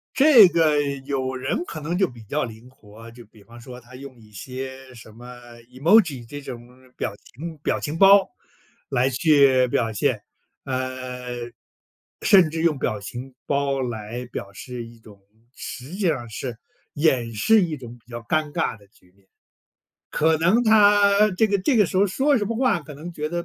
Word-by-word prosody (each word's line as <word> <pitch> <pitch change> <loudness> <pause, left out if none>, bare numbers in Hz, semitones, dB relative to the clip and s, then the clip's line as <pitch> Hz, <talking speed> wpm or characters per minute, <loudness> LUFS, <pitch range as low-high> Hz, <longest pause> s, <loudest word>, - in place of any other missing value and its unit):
这 265 -8 +8
个 155 -4 +2 0.2
有 130 -2 -2
人 130 +6 -2
可 165 - -7
能 165 +4 -3
就 190 - +2
比 115 -3 -13
较 145 +8 -2
灵 115 +2 -9
活， 115 -2 -15
就 120 0 -14
比 105 -1 -21
方 120 +2 -15
说 125 +1 -10
他 125 +1 -16
用 130 -2 -11
一 105 -1 -19
些 130 +4 -8
什 110 -2 -14
么 120 +2 -14 0.5
Emoji 145 - +3
这 145 +4 -8
种 120 -3 -9 0.3
表 - - -3
情 155 +10 -10
表 - - -1
情 155 +2 -4
包 195 0 +6 0.6
来 130 0 +1
去 135 -3 +4
表 115 -2 -1
现。 100 - -1 0.4
呃， 125 -2 -5 0.7
甚 185 -5 +5
至 160 0 -3
用 165 -4 +1
表 110 -5 -2
情 125 +6 -8
包 140 -1 0
来 120 0 -5
表 100 -5 -8
示 120 +3 -8
一 115 0 -15
种 105 -3 -17 0.4
实 130 +4 -8
际 200 - -6
上 120 -7 -2
是 115 +1 -6 0.4
掩 130 -7 +1
饰 220 - +4
一 165 -3 -3
种 120 -2 -11
比 120 +1 -22
较 120 - -5
尴 155 +5 -1
尬 115 - -2
的 100 - -21
局 90 -4 -27
面， 100 0 -31 0.8
可 160 +1 +2
能 185 +9 +3
他 205 -1 +5
这 220 +4 +2
个 200 -1 0
这 240 +8 +1
个 210 - +5
时 185 - -4
候 200 +2 +4
说 270 +8 +1
什 205 - -1
么 230 0 -3
话， 255 -9 +1
可 150 0 -11
能 170 +5 -9
觉 150 -1 -4
得 170 +1 -4
130 Hz, 205 characters per minute, -23 LUFS, 120-170 Hz, 0.8 s, 这